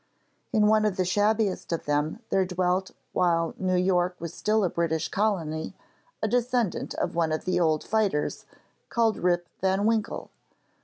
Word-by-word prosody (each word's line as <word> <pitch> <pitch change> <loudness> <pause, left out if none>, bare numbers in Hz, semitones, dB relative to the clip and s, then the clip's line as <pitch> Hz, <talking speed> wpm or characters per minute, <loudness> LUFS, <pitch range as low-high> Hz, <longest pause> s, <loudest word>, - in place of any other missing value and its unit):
In 215 -3 +3
one 215 0 +4
of 210 -3 0
the 185 - +1
shabbiest 205 +1 +1
of 165 - -2
them 150 +8 0
there 190 - +3
dwelt 185 +1 0 0.2
while 165 -2 +2
New 185 -1 +1
York 180 0 +2
was 170 -2 -6
still 215 0 +1
a 180 - +2
British 160 -2 -1
Colony 170 -7 -1 0.5
a - - +3
descendant 245 -2 0
of - - -2
one 165 -2 +1
of 155 - -2
the 180 -1 +1
old 155 -3 +2
fighters, 205 -9 0 0.4
called 230 -2 +2
Rip 175 -1 +1
van 190 +2 +1
Winkle. 225 0 -1
185 Hz, 160 wpm, -27 LUFS, 170-215 Hz, 0.5 s, one